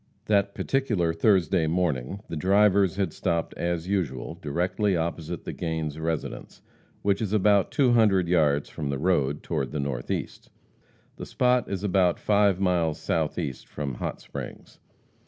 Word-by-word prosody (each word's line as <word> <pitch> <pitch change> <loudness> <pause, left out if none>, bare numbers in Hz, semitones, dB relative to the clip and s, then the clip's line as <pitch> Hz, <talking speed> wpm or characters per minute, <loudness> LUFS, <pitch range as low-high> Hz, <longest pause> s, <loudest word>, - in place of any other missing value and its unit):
That 100 -1 +1
particular 110 -12 0
Thursday 90 -2 +2
morning 85 0 -1
the - - -5
drivers 95 +2 +3
had 95 -5 -1
stopped, 85 -2 -1
as 85 0 -2
usual, 85 -9 -2
directly 90 +5 0
opposite 80 -1 -3
the - - -4
Gains 80 -2 -3
residence, 80 -1 -4 0.4
which 100 +1 +1
is 105 -2 -2
about 100 -2 +3
two 130 -4 +3
hundred 105 -6 +4
yards 75 -5 +2
from 75 -3 -5
the 70 - -1
road, 75 -3 0
toward 65 -3 -2
the 75 - -3
northeast. 70 -4 -4 0.7
The - - -7
spot 125 -1 +1
is 100 -1 -3
about 95 -3 +2
five 100 -3 +3
miles 85 -5 +1
southeast 80 -4 -2
from 70 -3 -4
Hot - - -4
Springs. - - -9
90 Hz, 145 wpm, -26 LUFS, 80-100 Hz, 0.7 s, hundred